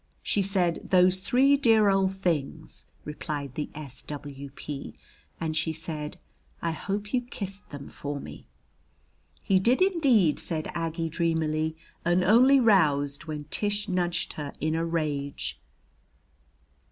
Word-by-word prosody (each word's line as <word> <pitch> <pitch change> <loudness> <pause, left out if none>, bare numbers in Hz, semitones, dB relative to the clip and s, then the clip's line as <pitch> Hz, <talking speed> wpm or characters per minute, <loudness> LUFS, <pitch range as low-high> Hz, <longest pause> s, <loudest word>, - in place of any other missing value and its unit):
"She 205 - +1
said: 185 -3 0
'Those 185 0 +5
three 265 +8 +4
dear 225 -6 +4
old 195 -1 +2
things!'" 160 -4 -2 0.2
replied 150 -2 -5
the 150 - -4
S. 140 -4 -7
W.P. 140 - -7 0.4
"And 160 -1 -2
she 160 +1 0
said: 155 -2 -5 0.4
'I 165 - -1
hope 205 +6 -4
you 250 - +3
kissed 200 -5 -6
them 140 -1 -8
for 145 0 -5
me.'" - - -10 1.0
"He 190 -1 +3
did 235 +7 +3
indeed," 275 - +3
said 155 -2 -3
Aggie 165 0 -2
dreamily, 160 -1 0 0.3
and 175 +2 +3
only 255 +8 +6
roused 150 - +3
when 150 -2 -5
Tish 205 0 +2
nudged 175 -3 -1
her 145 -2 -6
in 155 +1 0
a 165 +1 0
rage. 150 -4 -2
165 Hz, 130 wpm, -27 LUFS, 150-195 Hz, 1.0 s, only